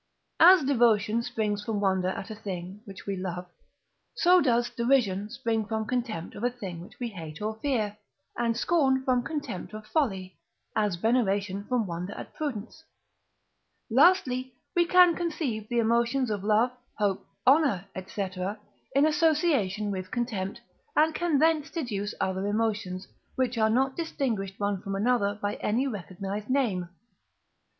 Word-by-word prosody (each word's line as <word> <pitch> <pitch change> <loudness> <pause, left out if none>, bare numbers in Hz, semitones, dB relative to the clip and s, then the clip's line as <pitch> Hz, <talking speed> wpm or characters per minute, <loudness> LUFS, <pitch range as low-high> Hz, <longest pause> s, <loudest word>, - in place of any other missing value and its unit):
As 360 -1 +8
devotion 230 -4 +3
springs 210 -3 -2
from 215 -1 -2
wonder 190 -2 +1
at 190 +3 -4
a - - -5
thing 190 -1 -6
which 195 -3 -10
we 200 - -2
love, 180 -1 -4 0.7
so 360 -4 +5
does 240 -4 +2
Derision 230 -5 +1
spring 225 -1 -1
from 220 +1 -2
contempt 230 -8 -3
of 210 - -8
a 245 - +3
thing 200 -9 -7
which 175 - -14
we 240 -2 -2
hate 160 -7 -8
or 215 +1 -3
fear, 220 -6 -1 0.4
and 230 -1 0
Scorn 265 -3 +2
from 255 -2 +2
contempt 245 - -5
of 215 0 -8
folly, 195 - -1 0.4
as 210 -4 +1
veneration 200 -2 0
from 245 -2 0
wonder 180 +2 -5
at - - -9
prudence. 285 0 -5 1.1
Lastly, 260 - +4 0.2
we 345 -1 +3
can 360 -2 +6
conceive 300 -11 -3
the 240 - -1
emotions 235 +2 +2
of 205 -2 -2
love, 215 +4 +3 0.3
hope, 200 -3 0 0.2
honour, 270 - +4 0.2
&c., 200 -1 -2 0.7
in 280 +2 +5
association 295 - +2
with 185 -1 -4
contempt, 210 -5 -3 0.3
and 315 +1 +4
can 340 -3 +1
thence 315 0 +3
deduce 210 - -3
other 190 +1 -1
emotions, 205 -3 -1 0.3
which 255 -2 0
are 220 -1 +3
not 265 +4 +2
distinguished 235 - -2
one 200 -2 -1
from 195 0 -4
another 205 -1 +1
by 205 0 -2
any 235 +6 0
recognized 200 -2 -5
name. 215 -10 0
220 Hz, 150 wpm, -28 LUFS, 200-265 Hz, 1.1 s, As